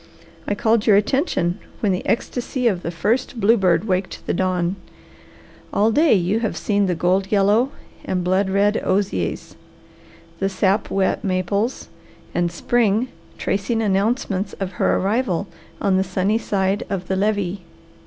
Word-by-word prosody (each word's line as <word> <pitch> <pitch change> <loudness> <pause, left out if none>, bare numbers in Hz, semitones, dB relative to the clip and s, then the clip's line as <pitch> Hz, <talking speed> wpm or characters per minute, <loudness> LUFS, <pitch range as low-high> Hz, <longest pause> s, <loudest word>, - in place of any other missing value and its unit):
"I 205 - 0
called 220 +1 +1
your 210 - +7
attention 205 - +1 0.2
when 205 - +1
the 180 - -1
ecstasy 250 +2 -1
of 190 -6 +1
the 170 - -4
first 225 +8 -1
bluebird 195 -6 +3
waked 185 -2 -2
the - - -1
dawn. 180 0 0 1.0
All 215 +2 +2
day 300 +1 +4
you 190 +4 +1
have 225 -3 -2
seen 205 -2 +1
the 180 - 0
gold 185 +3 +1
yellow 210 +5 +3 0.3
and 180 -1 -2
blood 190 +2 +1
red 205 +2 +2
osiers, 185 - -1 0.9
the 195 - +1
sap 195 +2 +1
wet 195 +4 0
maples 200 +5 -1 0.5
and 175 -1 0
spring 225 +5 +1 0.3
tracing 205 +4 -1
announcements 205 -1 0
of 195 -2 -4
her - - +3
arrival 200 -2 0 0.3
on 190 -2 +2
the 190 - +2
sunny 195 +3 0
side 195 -1 0
of 185 -3 -3
the 190 - 0
levee." 200 -2 0
195 Hz, 145 wpm, -21 LUFS, 185-220 Hz, 1.0 s, your